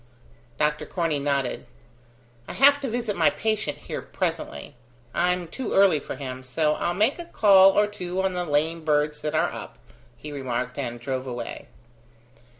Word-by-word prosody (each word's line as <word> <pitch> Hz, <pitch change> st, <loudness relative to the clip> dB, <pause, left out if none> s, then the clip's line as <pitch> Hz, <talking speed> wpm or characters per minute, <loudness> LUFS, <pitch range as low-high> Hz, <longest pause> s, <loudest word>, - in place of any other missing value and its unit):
Dr 150 Hz, 0 st, 0 dB
Corney 165 Hz, -5 st, -1 dB
nodded. 140 Hz, -2 st, -1 dB, 0.8 s
"I -, -, -6 dB
have 285 Hz, +1 st, +5 dB
to 270 Hz, -, -2 dB
visit 230 Hz, -3 st, -2 dB
my -, -, +4 dB
patient 220 Hz, -1 st, -2 dB
here -, -, -6 dB
presently. 70 Hz, -, -4 dB, 0.4 s
I'm 180 Hz, 0 st, +1 dB
too 250 Hz, +8 st, -5 dB
early 195 Hz, -6 st, +5 dB
for -, -, -7 dB
him: 130 Hz, -2 st, -6 dB
so 150 Hz, +4 st, +1 dB
I'll 175 Hz, +3 st, -1 dB
make 220 Hz, -, +2 dB
a 345 Hz, -, -6 dB
call 195 Hz, -, +6 dB
or 210 Hz, -, +5 dB
two 185 Hz, -3 st, -5 dB
on 190 Hz, -1 st, 0 dB
the 180 Hz, 0 st, -1 dB
lame 160 Hz, +1 st, 0 dB
birds 150 Hz, -1 st, +1 dB
that 150 Hz, -, -2 dB
are -, -, +1 dB
up," -, -, -8 dB, 0.4 s
he 150 Hz, -, -8 dB
remarked, 125 Hz, -2 st, -3 dB
and 120 Hz, -3 st, -4 dB
drove 130 Hz, +1 st, -4 dB
away. 120 Hz, -2 st, -6 dB
160 Hz, 165 wpm, -25 LUFS, 140-195 Hz, 0.8 s, call